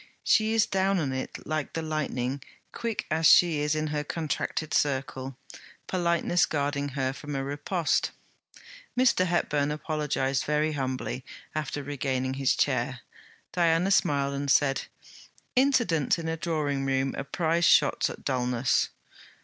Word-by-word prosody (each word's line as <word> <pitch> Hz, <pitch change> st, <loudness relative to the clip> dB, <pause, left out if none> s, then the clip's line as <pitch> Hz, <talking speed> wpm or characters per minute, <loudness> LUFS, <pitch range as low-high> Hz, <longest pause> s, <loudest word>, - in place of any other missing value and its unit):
She 220 Hz, 0 st, +3 dB
is 225 Hz, -2 st, +4 dB
down 195 Hz, 0 st, +1 dB
on 140 Hz, -6 st, -1 dB
it 130 Hz, 0 st, -5 dB
like 155 Hz, -2 st, -3 dB
the 165 Hz, -, -3 dB
lightning, 140 Hz, -4 st, -2 dB, 0.3 s
quick 230 Hz, -2 st, -3 dB
as 160 Hz, 0 st, +4 dB
she 170 Hz, -4 st, +6 dB
is 150 Hz, +1 st, +1 dB
in 155 Hz, 0 st, -1 dB
her 150 Hz, 0 st, -1 dB
contracted 155 Hz, 0 st, -3 dB
circle, 135 Hz, -2 st, -1 dB, 0.5 s
politeness 175 Hz, -1 st, +1 dB
guarding 145 Hz, -1 st, -1 dB
her 130 Hz, 0 st, 0 dB
from 145 Hz, +1 st, -7 dB
a 135 Hz, -, -1 dB
riposte. 155 Hz, +4 st, 0 dB, 0.9 s
Mr. 240 Hz, -8 st, +4 dB
Hepburn 150 Hz, -4 st, +1 dB
apologized 150 Hz, -3 st, -1 dB
very 150 Hz, +1 st, +1 dB
humbly, 130 Hz, -2 st, -3 dB, 0.3 s
after 145 Hz, -1 st, -3 dB
regaining 130 Hz, -2 st, -2 dB
his 135 Hz, -1 st, +1 dB
chair. -, -, 0 dB, 0.5 s
Diana 170 Hz, +2 st, +2 dB
smiled 140 Hz, -6 st, +2 dB
and 140 Hz, 0 st, -3 dB
said: 135 Hz, 0 st, +2 dB, 0.7 s
'Incidents 235 Hz, -, +3 dB
in 165 Hz, -1 st, -5 dB
a 160 Hz, -, -1 dB
drawing 150 Hz, -4 st, -1 dB
room 135 Hz, 0 st, 0 dB
are -, -, -3 dB
prize 165 Hz, +4 st, 0 dB
shots -, -, +4 dB
at -, -, -10 dB
Dulness.' 125 Hz, -1 st, +1 dB
150 Hz, 140 wpm, -27 LUFS, 135-165 Hz, 0.9 s, she